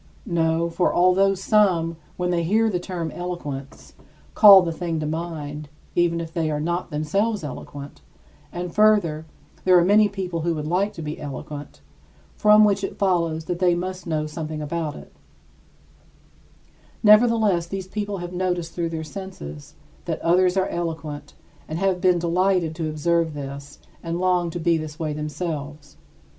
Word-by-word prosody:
No, 165 -1 +1
for 170 +2 +1
although 185 +2 +4
some, 185 -4 +2 0.2
when 180 0 -1
they 175 -1 +1
hear 220 +6 +2
the 180 - -1
term 175 -3 -4
eloquence, 150 -6 -6 0.4
call 200 -3 +9
the 170 - -2
thing 165 -1 -3
to 155 - -3
mind, 155 -2 -5 0.3
even 170 -1 +2
if 165 -1 -6
they 160 -2 0
are 150 -1 -1
not 170 +3 -2
themselves 195 +7 -1
eloquent 140 0 -8 0.5
and 175 0 -5
further, 200 -8 +3 0.4
there 185 -1 +6
are 175 - +4
many 210 +2 +5
people 185 -4 -4
who 170 0 0
would 150 -1 -4
like 185 +6 0
to 165 - -7
be 150 +1 -5
eloquent, 145 +1 -8 0.5
from 210 0 +6
which 200 -1 +1
it 195 - -4
follows 170 -5 0
that 175 0 -3
they 180 -1 +3
must 185 +1 -5
know 155 -2 -1
something 155 0 -5
about 150 0 -3
it - - -12 1.9
nevertheless, 215 -5 +5
these 190 +1 -5
people 205 0 -4
have 175 0 -6
noticed 180 -2 -2
through 170 -1 -2
their 160 -1 -4
senses 155 - -9 0.3
that - - -3
others 180 +2 +3
are 190 0 +2
eloquent 160 -4 -5 0.3
and 155 - -4
have 190 -1 0
been 180 -1 +4
delighted 175 0 +1
to 160 -1 -3
observe 160 +1 0
this 140 0 -7 0.2
and 165 0 -3
long 180 -2 +1
to 175 - -5
be 165 0 +2
this 155 -1 -7
way 155 -3 -2
themselves. 150 -1 -5
170 Hz, 160 wpm, -23 LUFS, 155-185 Hz, 1.9 s, call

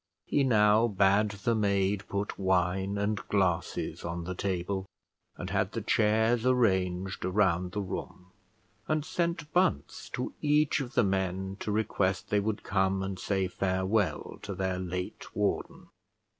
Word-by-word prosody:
He 145 - +2
now 110 -2 +4
bade 100 0 +3
the 100 +4 -1
maid 100 -2 +1
put 100 +1 -3
wine 95 +1 +1
and 105 +1 0
glasses 90 -4 0
on 85 0 -4
the 90 +2 -4
table; 95 +1 -2 0.5
and - - -5
had - - 0
the - - -2
chairs 110 +2 +2
arranged 95 -7 +1
around 90 -2 +1
the 105 - -1
room; 90 -1 -6 0.6
and 155 -1 0
sent 170 -3 -2
Bunce 175 - 0
to - - -3
each 150 0 +3
of 135 -2 -5
the - - +5
men 95 0 -1
to 105 - -3
request 100 -3 0
they 105 - +4
would 105 +1 -2
come 95 0 +1
and 95 -1 -4
say 95 -2 0
farewell 95 +2 -1
to 100 - -5
their 95 0 -1
late 90 0 -5
warden. - - -2
100 Hz, 145 wpm, -29 LUFS, 95-110 Hz, 0.6 s, the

